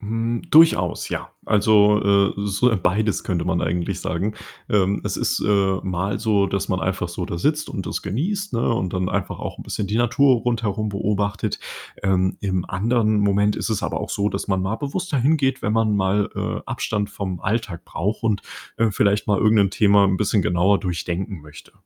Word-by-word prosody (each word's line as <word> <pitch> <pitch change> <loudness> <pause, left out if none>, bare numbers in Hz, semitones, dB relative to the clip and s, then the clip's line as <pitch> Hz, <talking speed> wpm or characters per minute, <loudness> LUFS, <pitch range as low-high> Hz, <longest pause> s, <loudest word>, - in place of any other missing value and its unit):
Hm, 115 +2 -2
durchaus, 150 - +4
ja. - - -4 0.2
Also, 105 0 +4
äh, 100 0 +3
so, 100 +4 +1
äh, 110 - +1
beides 100 +4 0
könnte 85 -3 -1
man 90 -1 0
eigentlich 85 +1 -2
sagen. 100 +5 -2 0.3
Ähm, 100 -1 +2
es - - -2
ist, - - 0
äh, 100 -2 +2
mal 95 +2 -2
so, 105 -3 +2
dass 100 0 -2
man 95 -2 0
einfach 95 -2 -2
so 85 +1 -4
da 85 - -5
sitzt 150 - 0
und 95 - -5
das - - -3
genießt, 190 - -2
ne, 120 0 +1
und 90 -5 -2
dann 90 0 -1
einfach - - -3
auch - - -6
'n - - -7
bisschen 100 - -3
die 105 - -1
Natur 120 +3 +4
rundherum 110 -3 -1
beobachtet. 100 0 -1 0.5
Ähm, 95 -1 +1
im 95 -3 -1
anderen 110 +2 +1
Moment 100 0 +2
ist - - -3
es 105 - -1
aber - - -2
auch - - -5
so, 100 +1 0
dass - - -4
man 95 -2 0
mal 100 +4 -1
bewusster 150 +3 -3
hingeht, 135 +1 +1
wenn 105 - 0
man 110 -2 +2
mal, 100 +1 +1
äh, - - -2
Abstand 105 -1 -2
vom 95 -3 -5
Alltag 100 -5 -2
braucht 105 +6 -3
und, 105 -3 0 0.3
äh, 115 -1 +2
vielleicht 100 +1 +1
mal 100 -2 +2
irgendein 105 -3 +4
Thema 100 +1 +4
'n 95 -1 +2
bisschen 105 +1 +1
genauer 90 +3 +2
durchdenken 90 +1 -4
möchte. 75 0 -14
100 Hz, 195 wpm, -22 LUFS, 95-110 Hz, 0.5 s, durchaus